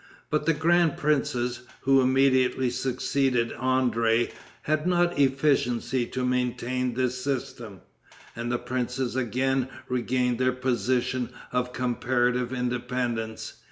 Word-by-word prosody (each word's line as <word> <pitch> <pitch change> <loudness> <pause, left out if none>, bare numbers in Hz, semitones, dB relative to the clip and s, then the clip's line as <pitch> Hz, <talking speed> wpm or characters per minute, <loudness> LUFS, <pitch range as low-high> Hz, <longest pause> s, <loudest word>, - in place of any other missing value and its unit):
But 150 +1 0
the 165 - +5
grand 165 +1 +2
princes, 125 -5 0 0.2
who 135 0 +4
immediately 130 -1 +3
succeeded 130 -1 0
André, 120 -3 +1 0.3
had 155 +2 0
not 175 -3 +2
efficiency 130 -3 +1
to 130 0 -3
maintain 125 0 -1
this 125 0 -1
system, 120 -8 -4 0.5
and 120 +1 -3
the 125 - +1
princes 125 0 -3
again 130 +2 0 0.2
regained 125 -1 0
their 130 0 +2
position 125 0 0 0.2
of 125 0 -1
comparative 125 0 0
independence. 125 -2 -3
125 Hz, 110 wpm, -26 LUFS, 120-130 Hz, 0.5 s, the